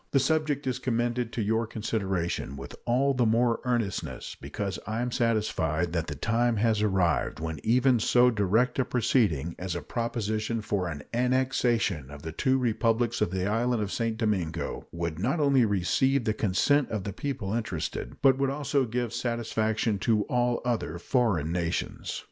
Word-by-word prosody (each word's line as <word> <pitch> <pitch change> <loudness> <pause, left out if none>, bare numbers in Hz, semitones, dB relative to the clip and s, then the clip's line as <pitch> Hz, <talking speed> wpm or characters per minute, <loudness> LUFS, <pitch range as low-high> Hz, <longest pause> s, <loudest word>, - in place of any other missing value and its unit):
The 135 - +3
subject 150 0 0
is 130 -1 -1
commended 120 -1 -1
to 115 - -1
your 110 +2 0
consideration 95 - -2
with 65 - -8
all 135 +4 +2
the 125 -3 +2
more 115 +1 +2
earnestness 120 -6 -2
because 95 +8 -4
I 110 +1 -2
am 125 0 -1
satisfied 85 -9 0
that 85 -2 -1
the 75 - -4
time 115 +8 +1
has 110 0 +2
arrived 95 -8 +1
when 80 -1 -4
even 125 +2 +3
so 125 +3 +4
direct 110 +5 +1
a - - +4
proceeding 100 - +1
as 90 -1 -3
a 85 - -3
proposition 110 +1 -2
for 100 -3 -1
an 75 -4 -5
annexation 120 - +1
of 75 0 -10
the 80 - -5
two 130 - +1
Republics 120 -1 +1
of - - +2
the 95 0 -2
island 115 +2 +1
of 100 - -4
St. 115 -2 -1
Domingo 95 -8 -2
would 85 -1 -3
not 135 - 0
only 140 -4 +4
receive 115 +7 +2
the 110 -1 +1
consent 115 +8 +2
of 105 -3 -3
the 100 - -4
people 125 -7 -3
interested, 110 -9 -3
but 135 -1 +5
would 135 -1 +2
also 140 -1 0
give 120 0 -2
satisfaction 110 -3 -1
to 105 0 +2
all 120 +2 0
other 115 -9 -1
foreign 90 - +1
nations. 85 -1 -2
115 Hz, 170 wpm, -28 LUFS, 95-125 Hz, -, but